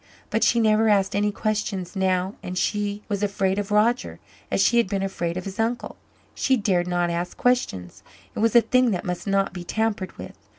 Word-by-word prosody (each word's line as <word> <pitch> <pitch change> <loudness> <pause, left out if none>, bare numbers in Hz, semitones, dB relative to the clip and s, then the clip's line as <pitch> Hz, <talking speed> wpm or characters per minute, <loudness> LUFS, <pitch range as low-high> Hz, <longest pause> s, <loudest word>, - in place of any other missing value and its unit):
But 220 - +1
she 235 - +4
never 220 0 +3
asked 195 -2 +2
any 205 +1 +1
questions 210 -3 -3
now 190 0 0
and 180 0 -6
she 205 +1 -1
was 205 -2 -2
afraid 195 -1 0
of 205 - -4
Roger, 220 +4 +1 0.3
as - - 0
she 235 +5 +4
had 235 - +3
been 195 0 -2
afraid 175 -3 -3
of 185 - -5
his 195 +2 -7
uncle. 230 +2 -1 0.4
She 265 -1 +2
dared 185 -5 +1
not 175 -1 0
ask 170 +1 -3
questions. 95 - 0 0.3
It - - -6
was 225 +1 +2
a 235 - +9
thing 255 +1 +3
that 195 -1 -2
must 180 +2 -4
not 195 -1 +1
be 180 -2 -6
tampered 210 0 -2
with. - - -8
200 Hz, 205 wpm, -24 LUFS, 185-220 Hz, 0.4 s, a